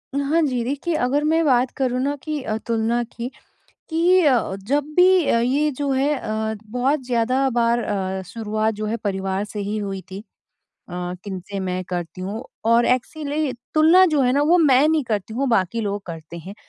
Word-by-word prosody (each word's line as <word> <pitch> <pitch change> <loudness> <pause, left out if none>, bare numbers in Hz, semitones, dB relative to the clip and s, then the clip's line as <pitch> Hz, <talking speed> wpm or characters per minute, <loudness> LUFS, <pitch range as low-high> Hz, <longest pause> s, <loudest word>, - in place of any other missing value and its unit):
हाँ 285 +4 +1
जी, 255 -6 0
देखिए 285 +7 -2
अगर 285 +4 +1
मैं 320 +2 +2
बात 255 -2 +3
करूँ 255 -2 0
ना 285 +2 0
कि 305 -2 -3
अ, 215 -4 -3
तुलना 230 +1 +1
की 235 +1 -7 0.6
कि 350 +3 +4
अ, 245 -8 +2
जब 290 +1 +2
भी 365 -2 +5
अ, 235 - +3
ये 280 +5 +1
जो 280 0 -3
है 275 +3 +1
अ, 220 0 -3 0.2
बहुत 260 +5 +1
ज़्यादा 255 +3 +1
बार 235 0 +2
अ, 190 -1 -2
शुरुआत 215 -1 -2
जो 215 +1 -4
है 225 +2 -1
परिवार 195 0 -1
से 210 0 -6
ही 205 +1 -3
हुई 195 -2 -4
थी। 195 +3 -8 0.7
अ, 180 0 -4
किन 195 -2 -5
से 200 -1 -4
मैं 185 -1 -2
करती 175 0 -5
हूँ 200 +5 -4 0.2
और 230 +1 +4
एक्चुअली 290 +2 -1 0.2
तुलना 325 +4 +6
जो 295 - +3
है 250 - +3
ना 285 +2 +2
वो 335 +4 +4
मैं 285 -3 +5
नहीं 315 -2 +2
करती 220 -2 -3
हूँ 270 +2 0
बाकी 230 -1 +1
लोग 205 -2 -3
करते 165 0 -8
हैं 185 +4 -9
240 Hz, 195 wpm, -22 LUFS, 205-285 Hz, 0.7 s, तुलना